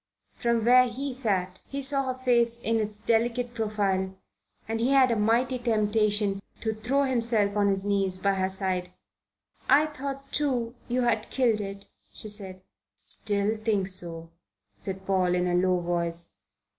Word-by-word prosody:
From 235 -2 0
where 250 +1 +6
he 265 +3 -4
sat 190 -7 -2
he 275 - -5
saw 275 0 +3
her 255 0 -10
face 235 -1 +3
in 225 0 +1
its 210 -1 -2
delicate 235 +2 0
profile, 200 -4 -1 0.5
and 225 0 -2
he 240 +3 +1
had 260 -2 +5
a - - +2
mighty 235 +4 +1
temptation 210 -3 +1 0.2
to 220 -1 -1
throw 245 +6 0
himself 230 -6 +1
on 205 -1 +2
his 195 0 0
knees 195 -2 0
by 200 +1 +1
her 190 -1 0
side. 185 -2 -1 0.8
"I 285 +3 +6
thought, 275 -2 -6
too, 250 -6 -1
you 250 +1 0
had 225 -2 0
killed 235 -5 +1
it," 195 0 -7 0.2
she 215 - -6
said. 190 -3 -2 0.4
"Still 205 0 0
think 215 -3 0
so," 165 -3 -1 0.4
said 190 0 -6
Paul, 185 -2 +1
in 180 0 +1
a 180 - 0
low 180 0 +2
voice. 170 - -1
215 Hz, 160 wpm, -27 LUFS, 190-240 Hz, 0.8 s, where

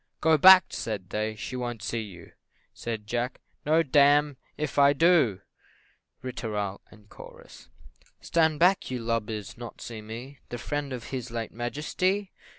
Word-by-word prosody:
"Go 160 0 +4
back," 185 +3 +9
said 100 -5 -5
they, 110 +1 -2
"she 120 +4 -6
won't 120 -3 -4
see 115 +2 -2
you!" 90 -6 -11 0.4
Said 110 -3 -5
Jack 120 +3 -3 0.3
"No 160 +2 +4
damme 145 0 +4 0.2
if 150 -1 -2
I 140 0 +6
do!" 150 - +3 0.8
Ri 130 -1 -5
tooral, 105 -4 -3 0.7
&c. - - -14 0.5
"Stand 160 -2 +1
back, 180 +4 +3
you 130 - -2
lubbers! 115 -2 -3
not 120 -1 -9
see 115 -2 -7
me, 120 +6 -9
The 120 - -5
friend 145 +2 -4
of 125 -3 -7
his 125 -2 -4
late 115 -1 -4
Majesty?" 180 - -2
125 Hz, 150 wpm, -27 LUFS, 110-150 Hz, 0.8 s, back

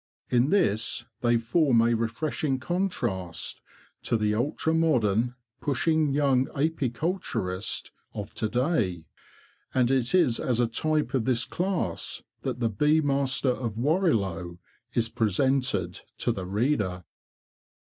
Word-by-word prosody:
In 125 +3 +3
this 115 - +1
they 120 -1 +3
form 120 +2 +3
a 120 0 +3
refreshing 130 +5 -1
contrast 120 - -2 0.4
to 115 - 0
the 105 -1 +1
ultra 145 +7 0
modern, 125 -8 +2 0.2
pushing 155 +2 +1
young 135 -2 +2
apiculturist 135 - -2 0.2
of 105 -2 -6
to 110 - -2
day; 120 - 0 0.7
and 125 -1 +3
it 130 +2 +2
is 130 -11 +3
as 125 -2 0
a 120 - +4
type 155 +6 -1
of 125 -5 +1
this 120 -2 +1
class 175 - -2 0.2
that - - -3
the 115 -2 +1
Bee 150 +9 +3
Master 140 -3 +1
of 115 -4 -3
Warrilow 110 - 0 0.4
is 115 -1 +2
presented 115 -3 0 0.2
to - - 0
the 95 -2 -4
reader. 100 -4 0
125 Hz, 125 wpm, -27 LUFS, 110-150 Hz, 0.7 s, a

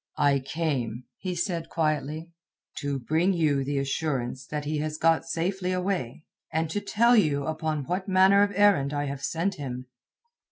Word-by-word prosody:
"I 140 -2 +3
came," 130 -5 -2 0.2
he 185 -2 -3
said 170 -2 -2
quietly, 155 +1 -1 0.5
"to 140 -1 -2
bring 160 +9 +1
you 150 -5 +2
the 140 +1 -2
assurance 135 -2 -2
that 150 -1 -4
he 150 0 -1
has 155 0 -3
got 165 0 +3
safely 180 +2 -1
away, 180 -8 -2 0.3
and 160 0 -1
to 205 - -1
tell 235 +4 +4
you 145 -9 +2
upon 155 -2 -2
what 180 +7 -3
manner 190 +1 +5
of 205 0 +3
errand 190 -9 +4
I 145 0 -1
have 140 -1 -5
sent 180 +4 -1
him." 130 -3 -5
155 Hz, 165 wpm, -27 LUFS, 140-180 Hz, 0.5 s, manner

